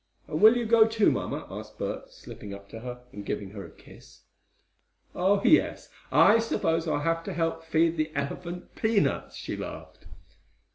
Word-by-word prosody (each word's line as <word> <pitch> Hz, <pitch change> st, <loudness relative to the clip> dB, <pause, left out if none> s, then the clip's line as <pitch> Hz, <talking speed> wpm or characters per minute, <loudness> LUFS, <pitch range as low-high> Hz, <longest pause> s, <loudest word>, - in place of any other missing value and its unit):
"And 155 Hz, -, -3 dB
will 220 Hz, +3 st, +8 dB
you 240 Hz, -, -1 dB
go, 225 Hz, 0 st, +6 dB
too, 225 Hz, -1 st, +3 dB
mamma?" -, -, -3 dB
asked -, -, -9 dB
Bert, -, -, -5 dB
slipping 105 Hz, -, -9 dB
up 100 Hz, 0 st, -13 dB
to 115 Hz, -, -8 dB
her, 125 Hz, +1 st, -7 dB
and 105 Hz, -, -8 dB
giving 100 Hz, -1 st, -4 dB
her 100 Hz, -1 st, -8 dB
a 85 Hz, -, -10 dB
kiss. -, -, -17 dB, 0.9 s
"Oh, 195 Hz, +3 st, +2 dB
yes, 315 Hz, -, +3 dB, 0.2 s
I 220 Hz, +3 st, +6 dB
suppose 165 Hz, -7 st, 0 dB
I'll 150 Hz, -, 0 dB
have 165 Hz, +2 st, 0 dB
to -, -, -4 dB
help 165 Hz, -1 st, -1 dB
feed 165 Hz, +1 st, +2 dB
the 155 Hz, 0 st, -1 dB
elephant 170 Hz, +5 st, -5 dB
peanuts," 220 Hz, -2 st, 0 dB
she -, -, -5 dB
laughed. -, -, -9 dB
165 Hz, 175 wpm, -27 LUFS, 135-220 Hz, 0.9 s, will